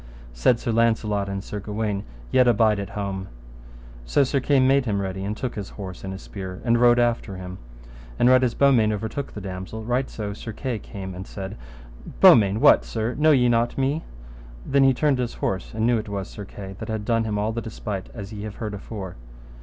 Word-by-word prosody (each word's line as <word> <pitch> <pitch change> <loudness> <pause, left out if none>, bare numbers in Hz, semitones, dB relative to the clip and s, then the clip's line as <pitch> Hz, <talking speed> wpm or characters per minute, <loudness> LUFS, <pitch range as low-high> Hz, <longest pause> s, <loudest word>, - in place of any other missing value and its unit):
Said - - +3
Sir 120 - -2
Launcelot 110 -3 +1
and 100 0 -4
Sir 105 - -5
Gawaine, 105 -1 -2 0.3
Yet 125 -1 +5
abide 110 -3 +4
at 100 - -4
home. 100 -2 -4 0.8
So 100 - +3
Sir 140 +1 +1
Kay 135 +1 +3
made 135 +1 +4
him 105 -4 0
ready 95 0 -3
and 105 +2 -3
took 130 -3 -3
his 100 -2 -6
horse 95 -3 -8
and 95 - -4
his 95 - -8
spear, 95 -2 -7
and 120 0 +3
rode 120 0 +6
after 120 -4 +1
him. 90 0 -8 0.6
And 120 - +4
right 130 0 +6
as 120 -2 +1
Beaumains 120 -6 +4
overtook 110 +6 -4
the 105 - -7
damosel, 95 +3 -6
right 125 +3 0
so 105 -2 -5
came - - -4
Sir 110 +1 -7
Kay 120 -1 -3 0.2
and 95 0 -7
said, 95 +1 -6 0.6
Beaumains, 100 -2 +7
what, - - +6
sir, 115 +2 -2
know 155 +5 +3
ye 130 -5 +5
not 120 0 +1
me? 140 +4 0 0.6
Then 140 0 +3
he 135 - +5
turned 145 -1 +2
his 120 -1 -2
horse, 95 -1 -2
and 110 0 -1
knew 120 -1 +3
it 110 0 -7
was 100 -2 -3
Sir 105 - -8
Kay, 95 0 -9
that - - -6
had 110 -1 -3
done 115 -1 +1
him 105 -2 -1
all 105 +2 0
the 115 +1 -3
despite 105 -4 -5
as 105 -2 -8
ye 105 - -6
have 105 -1 -6
heard 110 -2 -5
afore. 100 - -7
110 Hz, 215 wpm, -24 LUFS, 100-120 Hz, 0.8 s, Beaumains